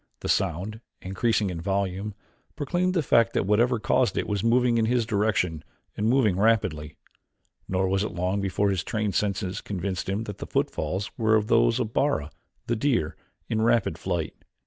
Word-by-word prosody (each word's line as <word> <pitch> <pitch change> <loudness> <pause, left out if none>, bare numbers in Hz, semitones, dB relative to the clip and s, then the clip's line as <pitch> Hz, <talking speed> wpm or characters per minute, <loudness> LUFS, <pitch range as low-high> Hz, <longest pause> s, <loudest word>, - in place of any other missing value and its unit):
The - - -4
sound, 95 +5 -1 0.2
increasing 100 +1 0
in 85 -2 -5
volume, 100 +2 -2 0.4
proclaimed 175 +5 0
the 165 - +2
fact 115 -3 +3
that - - +1
whatever 115 +5 +3
caused 125 +3 +1
it - - 0
was 100 -2 -1
moving 120 0 +3
in 110 - +2
his 120 0 +1
direction 105 -7 0 0.3
and 105 +2 0
moving 115 -8 +3
rapidly. 95 -9 +1 0.7
Nor 95 0 0
was 95 +1 +1
it 110 - -2
long 90 +3 -1
before 100 +1 +1
his 95 -2 -1
trained 105 -1 -2
senses 100 -2 -1
convinced 95 -1 -3
him 100 +3 -1
that 105 -3 -7
the - - -6
footfalls 100 +4 -2
were 110 -1 +4
those - - +3
of 110 - -2
Bara, 110 - 0 0.3
the 120 - 0
deer, 115 - 0 0.3
in 110 - 0
rapid 115 -7 +2
flight. 85 -2 -2
105 Hz, 170 wpm, -26 LUFS, 95-115 Hz, 0.7 s, were